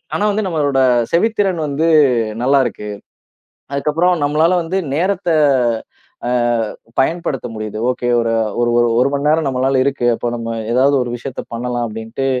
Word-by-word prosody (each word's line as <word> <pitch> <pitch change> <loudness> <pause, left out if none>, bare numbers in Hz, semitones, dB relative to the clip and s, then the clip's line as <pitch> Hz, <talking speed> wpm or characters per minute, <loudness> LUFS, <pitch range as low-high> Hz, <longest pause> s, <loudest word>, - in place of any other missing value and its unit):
ஆனா 210 - 0
வந்து 210 0 -1
நம்மளோட 145 -5 0 0.3
செவித்திறன் 195 -2 +1
வந்து 155 +4 0 0.5
நல்லா 140 +2 +4
இருக்கு. 105 -1 -7 0.8
அதுக்கு 140 +2 -1
அப்புறம் 180 +3 +2
நம்மளால 155 +5 +2
வந்து 175 +4 -3 0.2
நேரத்த 180 0 0 1.0
அ - - 0 0.7
பயன்படுத்த 140 -2 0
முடியுது. 110 0 -5
ஒகே 125 -1 -3
ஒரு 115 0 0 0.3
ஒரு 120 0 +2 0.3
1 130 - +3
மணி 140 +1 -1
நேரம் 155 0 +2
நம்மளால 130 0 +1
இருக்கு. 135 -3 -1
அப்ப 120 - -5
நம்ம 115 -1 -4 0.2
ஏதாவது 135 +3 +3
ஒரு 120 - -4
விஷயத்த 125 +2 -6
பண்ணலாம் 120 0 -2
அப்படின்ட்டு, 115 +4 -5
140 Hz, 145 wpm, -17 LUFS, 120-165 Hz, 1.0 s, நல்லா